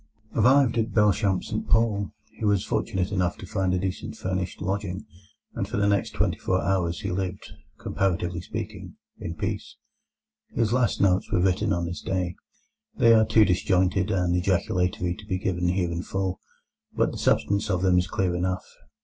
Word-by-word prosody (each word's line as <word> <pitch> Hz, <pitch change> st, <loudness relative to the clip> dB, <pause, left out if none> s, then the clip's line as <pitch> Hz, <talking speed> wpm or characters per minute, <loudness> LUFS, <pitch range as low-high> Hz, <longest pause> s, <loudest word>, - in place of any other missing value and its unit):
Arrived 130 Hz, -2 st, +4 dB
at 115 Hz, 0 st, -2 dB
Belchamp 100 Hz, -3 st, +3 dB
St -, -, -4 dB
Paul, 110 Hz, -4 st, +2 dB, 0.2 s
he -, -, -11 dB
was 105 Hz, -2 st, +2 dB
fortunate 90 Hz, 0 st, -1 dB
enough 90 Hz, -3 st, 0 dB
to -, -, -9 dB
find 95 Hz, -4 st, -1 dB
a 90 Hz, -, +2 dB
decent 95 Hz, 0 st, -3 dB
furnished 95 Hz, 0 st, -3 dB
lodging, 100 Hz, +1 st, -3 dB, 0.5 s
and -, -, -3 dB
for -, -, -3 dB
the 100 Hz, 0 st, +2 dB
next 100 Hz, -2 st, 0 dB
twenty -, -, 0 dB
four -, -, +1 dB
hours 90 Hz, -3 st, 0 dB
he -, -, -3 dB
lived, 95 Hz, 0 st, -4 dB, 0.3 s
comparatively 90 Hz, -2 st, -1 dB
speaking, -, -, -6 dB, 0.2 s
in 85 Hz, -, -5 dB
peace. -, -, -4 dB, 0.8 s
His 115 Hz, 0 st, +1 dB
last 125 Hz, -3 st, +1 dB
notes 95 Hz, -2 st, +2 dB
were -, -, +2 dB
written 90 Hz, 0 st, +2 dB
on 85 Hz, 0 st, 0 dB
this 85 Hz, +1 st, -5 dB
day. 90 Hz, -2 st, -1 dB, 0.6 s
They 115 Hz, 0 st, +6 dB
are 110 Hz, -1 st, +5 dB
too 110 Hz, -1 st, +5 dB
disjointed 95 Hz, +1 st, +2 dB
and 90 Hz, -3 st, +1 dB
ejaculatory 90 Hz, -1 st, 0 dB
to 105 Hz, +3 st, -12 dB
be 95 Hz, -, 0 dB
given 90 Hz, -1 st, -1 dB
here 90 Hz, -1 st, 0 dB
in 85 Hz, 0 st, -2 dB
full, 95 Hz, 0 st, -2 dB, 0.5 s
but -, -, +1 dB
the -, -, -7 dB
substance 100 Hz, +1 st, +1 dB
of 90 Hz, -2 st, 0 dB
them 90 Hz, -1 st, +4 dB
is 90 Hz, -, -1 dB
clear 90 Hz, 0 st, 0 dB
enough. 90 Hz, +1 st, -1 dB
95 Hz, 175 wpm, -26 LUFS, 90-100 Hz, 0.8 s, They